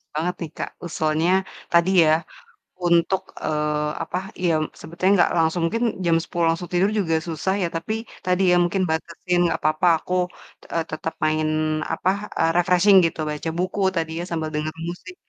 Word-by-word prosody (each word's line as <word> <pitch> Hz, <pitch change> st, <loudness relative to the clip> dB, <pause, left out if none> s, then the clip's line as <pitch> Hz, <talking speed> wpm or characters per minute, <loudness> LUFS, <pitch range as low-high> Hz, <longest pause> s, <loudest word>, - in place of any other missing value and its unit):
Banget 175 Hz, +3 st, 0 dB
nih 160 Hz, -, -5 dB
Kak, -, -, -3 dB, 0.2 s
usulnya 160 Hz, +1 st, 0 dB, 0.4 s
tadi 170 Hz, +2 st, +5 dB
ya, 155 Hz, -, +4 dB, 0.7 s
untuk, 170 Hz, +2 st, +3 dB, 0.2 s
eee, 150 Hz, -1 st, 0 dB
apa, 180 Hz, -, -4 dB, 0.3 s
yem 160 Hz, -3 st, +2 dB, 0.2 s
sebetulnya 180 Hz, +4 st, 0 dB
nggak 175 Hz, -, +4 dB
langsung, 165 Hz, +1 st, +2 dB
mungkin 230 Hz, +7 st, -1 dB, 0.2 s
jam 165 Hz, -1 st, +4 dB
10.00 170 Hz, -1 st, -1 dB
langsung 170 Hz, +2 st, -2 dB
tidur 190 Hz, +3 st, +3 dB
juga 165 Hz, -4 st, +1 dB
susah 165 Hz, +4 st, -1 dB
ya, 175 Hz, -, +1 dB
tapi 165 Hz, +6 st, -2 dB, 0.3 s
tadi 180 Hz, +1 st, +1 dB
ya, -, -, +5 dB
mungkin 185 Hz, +2 st, 0 dB
batasin 170 Hz, +2 st, -1 dB
nggak -, -, -1 dB
apa-apa 155 Hz, +3 st, +2 dB
aku, 180 Hz, -, -5 dB, 0.6 s
e -, -, 0 dB
tetap 155 Hz, +1 st, -4 dB
main, 155 Hz, 0 st, +1 dB, 0.5 s
apa, 180 Hz, -, 0 dB, 0.3 s
e -, -, +3 dB, 0.2 s
refreshing 180 Hz, +3 st, +5 dB
gitu, 165 Hz, -, -2 dB
baca 150 Hz, +2 st, -3 dB
buku 185 Hz, +3 st, -2 dB, 0.2 s
tadi 160 Hz, -1 st, -1 dB
ya, -, -, -3 dB
sambil 160 Hz, -2 st, -2 dB
dengarin 155 Hz, +2 st, -3 dB
musik, 360 Hz, -, -11 dB
170 Hz, 170 wpm, -23 LUFS, 155-180 Hz, 0.7 s, tadi